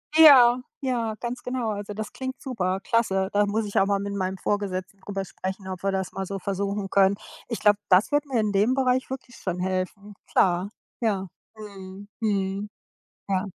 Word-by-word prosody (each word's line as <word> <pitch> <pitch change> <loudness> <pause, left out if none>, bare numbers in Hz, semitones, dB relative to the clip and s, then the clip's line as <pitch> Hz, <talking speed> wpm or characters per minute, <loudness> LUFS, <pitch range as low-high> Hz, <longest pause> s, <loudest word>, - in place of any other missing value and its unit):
Ja, 255 -6 +8 0.2
ja, 235 -4 -1
ganz 240 +1 -4
genau. 250 -3 -2
Also, 205 0 -5
das 215 0 -5
klingt 260 0 -5
super. 190 -8 -2
Klasse. 195 -4 +1
Da 205 0 +3
muss 215 +2 0
ich 205 - +1
auch 195 - +3
mal 200 -1 +2
mit 200 0 -4
meinem 190 -1 -2
Vorgesetzten 195 -1 -2
drüber 195 -1 -4
sprechen, 190 +1 -6
ob 185 -1 -5
wir 195 - +1
das 190 -1 -2
mal 195 -1 -4
so 195 +1 -3
versuchen 200 +1 -2
können. 195 0 +5 0.3
Ich 230 - -3
glaube, 210 -1 +4
das 185 +9 +5
wird 290 +1 +2
mir 255 -4 0
in 215 -1 +1
dem 210 +6 +3
Bereich 260 -1 +1
wirklich 260 -2 -7
schon 180 -2 -3
helfen. 190 +3 -3
Klar, 180 +1 +2 0.3
ja. 200 -5 0 0.3
Mhm, 200 -2 -10
mhm. 200 -2 -1 0.6
Ja. 190 0 +1
200 Hz, 185 wpm, -25 LUFS, 190-230 Hz, 0.6 s, Ja